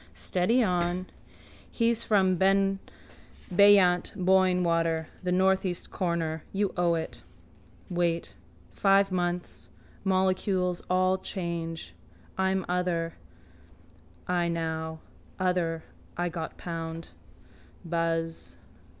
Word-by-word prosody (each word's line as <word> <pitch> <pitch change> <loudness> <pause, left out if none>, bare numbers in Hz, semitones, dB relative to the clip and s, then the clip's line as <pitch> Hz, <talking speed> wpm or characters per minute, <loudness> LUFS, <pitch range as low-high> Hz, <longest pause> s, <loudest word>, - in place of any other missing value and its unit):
Steady 190 - +1
on. 180 -1 0 0.6
He's 230 -1 +1
from 190 -5 +3
beyant 195 0 +2
Boyne 185 -1 +3
water. 165 -1 +1
The 180 - -1
northeast 190 -1 +1
corner. 165 -3 -1
You 200 0 0
owe 175 -1 +2
it. 165 - -5 0.7
Wait. 175 -2 -1 0.4
Five 195 0 +3
months. 175 -1 -3 0.3
Molecules 185 -1 +1
all 185 +1 +2
change. 165 - -5 0.4
I 190 0 +1
am 190 -1 0
other 175 -2 -1 1.1
I 175 -1 +1
now. 160 -1 -3 0.4
Other 175 -3 0 0.3
I 175 0 0
got 165 -1 -6
pound. 165 -1 -5 0.8
Buzz. 165 - -2
180 Hz, 90 wpm, -28 LUFS, 165-190 Hz, 1.1 s, from